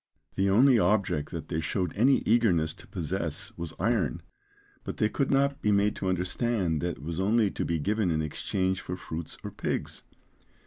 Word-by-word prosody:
The 95 +1 +1
only 120 +5 +6
object 100 -9 +1
that 80 -3 -6
they 80 - -1
showed 90 +2 -1
any 130 +6 +4
eagerness 95 -9 +3
to - - -15
possess - - -3
was 85 -2 -6
iron, 95 - 0 0.6
but - - -5
they 105 - +2
could 135 +4 -1
not 140 0 +2
be 105 - +2
made 100 +1 +3
to 95 - -1
understand 90 -2 0
that 85 -1 -2
it - - -13
was 85 +2 -4
only 105 +1 +3
to - - -3
be 85 - 0
given 100 +5 0
in 80 -2 +1
exchange 95 +4 -1
for 90 - -5
fruits 80 -2 -7
or - - -5
pigs. - - -3
95 Hz, 185 wpm, -28 LUFS, 85-110 Hz, 0.6 s, only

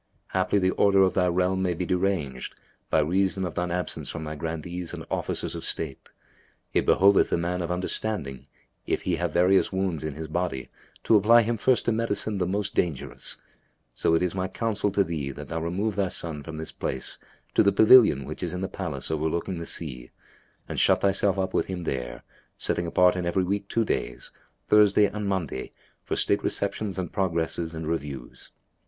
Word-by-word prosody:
Haply, 95 +2 +1
the 95 -1 +2
order 100 -1 +4
of 95 - +2
thy 90 -1 +2
realm 90 +1 +1
may 90 -2 0
be 90 - -2
deranged, 90 -8 -1 0.3
by 80 - +3
reason 95 +4 +1
of 85 - -4
shine 90 0 -2
absence 90 -1 -3
from 85 - -5
thy 75 - -4
Grandees 80 +3 -5
and - - -8
Officers - - -2
of - - -6
State. 75 -5 -3 0.6
It - - +1
behoveth 100 +2 +5
the - - +1
man 90 +2 -1
of 85 - -3
understanding, 90 - -2 0.4
if - - 0
he - - 0
have - - -1
various 90 +2 +3
wounds 95 -5 -1
in 75 -2 -4
his 80 +1 -6
body, 80 -4 -2 0.3
to 115 - +4
apply 115 +3 +6
him 115 +2 0
first 125 +3 +2
to - - +2
medicine 110 -2 -1
the 90 - 0
most 100 +1 -2
dangerous; 80 -7 -1 0.6
so 80 - +2
it 80 - +2
is 90 - 0
my 95 0 -1
counsel 105 +1 0
to 100 - +3
thee 80 -6 -3
that 75 +2 -8
thou 80 0 -3
remove 95 +6 -1
thy 100 -2 +1
son 80 -4 -4
from 80 +2 -8
this 80 0 -6
place 65 - -5 0.3
to - - +5
the 100 - +4
pavilion 110 - +6
which - - -7
is 85 -1 -3
in 90 - -4
the 95 - -1
palace 85 -8 -4
overlooking 80 +3 -1
the 85 - -6
sea; 65 -7 -4 0.6
and - - -3
shut - - +4
thyself 100 0 +2
up 95 -1 -1
with - - +1
him 90 -2 -4
there, - - -4 0.3
setting 85 - 0
apart 90 +2 +4
in 90 -1 -2
every 90 +2 +1
week 100 +2 -2
two 115 +1 0
days, 60 -10 -3 0.4
Thursday 105 -1 +5
and 105 +1 -3
Monday, 90 -9 -3 0.3
for - - -2
state - - +1
receptions 100 0 -2
and 90 -3 -4
progresses 85 -3 -1
and 80 -1 -5
reviews. 70 -6 -5
90 Hz, 195 wpm, -26 LUFS, 80-100 Hz, 0.6 s, apply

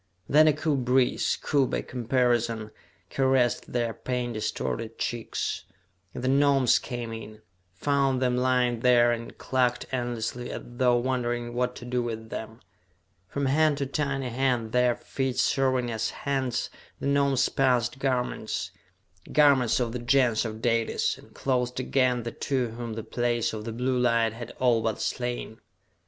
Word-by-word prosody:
Then 155 +2 +6
a 155 - +5
cool 150 0 0
breeze, 125 0 +2
cool 140 -3 +2
by - - -2
comparison, 120 -3 0 0.4
caressed 130 -3 +1
their 120 -2 0
pain 125 -1 -3
distorted 110 +1 -3
cheeks, 120 -2 -3 0.5
and - - -5
the - - 0
Gnomes 135 -2 +4
came 120 -2 -5
in, 110 -1 -9 0.3
found 135 +4 +1
them 125 -1 +1
lying 125 -1 +2
there, 120 0 +5
and 115 0 -5
clucked 125 -1 0
endlessly 120 -1 -3
as - - -6
though 120 0 +2
wondering 120 -1 -1
what 125 0 -1
to 120 - -9
do 125 0 -1
with 110 -1 -5
them. 110 +1 -7 0.7
From 140 +7 -2
hand 150 +2 +3
to 140 - -1
tiny 135 -2 -2
hand, 120 -2 0
their 125 0 +3
feet 130 -2 -3
serving 130 -3 +1
as 110 0 -1
hands, 135 -3 -2 0.3
the - - -5
Gnomes 140 -1 +3
passed 130 -1 +1
garments 130 -2 -2 0.6
garments 140 -5 +4
of 120 -2 -1
the 125 - -4
Gens 120 -2 +2
of 110 0 -6
Dalis, 115 -1 +1
and - - -17
clothed 125 -2 -1
again 130 -2 +1
the 115 - -4
two 130 -2 -1
whom 115 0 -6
the 110 0 -5
Place 120 0 -1
of 110 -1 -5
the 115 - -4
Blue 125 +2 0
Light 115 -2 +2
had 115 0 -7
all 120 -3 +3
but 110 -1 -1
slain. 120 0 -3
125 Hz, 155 wpm, -27 LUFS, 115-130 Hz, 0.7 s, Then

